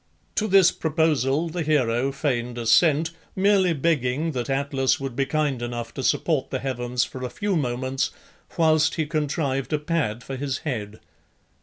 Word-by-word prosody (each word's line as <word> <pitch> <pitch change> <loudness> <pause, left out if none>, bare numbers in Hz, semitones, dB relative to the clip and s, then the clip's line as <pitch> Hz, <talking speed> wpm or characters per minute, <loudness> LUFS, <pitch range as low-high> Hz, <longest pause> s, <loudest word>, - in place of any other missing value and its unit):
To 215 - 0
this 190 -3 +6
proposal 155 -2 +1
the 170 +1 -3
hero 135 -4 +1
feigned 125 -4 -2
assent, 150 +7 +3 0.2
merely 195 -2 +3
begging 150 0 0
that 125 -2 -3
Atlas 135 -1 +1
would 135 -3 -5
be 135 +1 0
kind 145 -4 0
enough 120 -1 -4
to - - -5
support 150 +1 +1
the 130 - -2
heavens 125 -2 -1
for 130 - -7
a 125 - -2
few 205 +6 -2
moments 130 -2 -1 0.5
whilst 160 -1 +3
he 160 - 0
contrived 145 -3 -1
a - - +3
pad 145 -7 -2
for 135 - -6
his 135 -1 -2
head. 110 -7 -4
140 Hz, 160 wpm, -24 LUFS, 125-160 Hz, 0.5 s, this